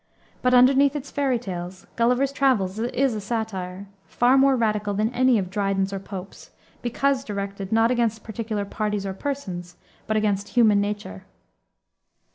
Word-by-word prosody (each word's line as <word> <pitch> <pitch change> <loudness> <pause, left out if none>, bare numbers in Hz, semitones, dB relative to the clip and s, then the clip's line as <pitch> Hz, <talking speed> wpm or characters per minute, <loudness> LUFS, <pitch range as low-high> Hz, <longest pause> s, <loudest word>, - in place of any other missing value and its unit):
But 250 0 +3
underneath 270 +3 +5
its 285 -1 -5
fairy 275 -3 +1
tales, 185 -4 -7
Gulliver's 250 +4 +2
Travels 220 -9 +1
is 245 +2 0
a 215 - -4
satire, 200 -4 -4 0.2
far 245 +2 +3
more 270 0 +5
radical 210 -3 0
than 215 +4 0
any 255 -1 +4
of 185 -3 -3
Dryden's 195 -1 0
or 195 - -3
Pope's, 195 -1 -9 0.3
because 265 +3 0
directed, 200 -3 -5
not 225 +1 +3
against 230 -3 0
particular 220 -2 -4
parties 210 -1 -2
or 195 - -3
persons, 190 -8 -5 0.3
but 215 - +1
against 205 -2 0
human 215 -4 +4
nature. 205 - -5
215 Hz, 150 wpm, -24 LUFS, 195-250 Hz, 0.3 s, underneath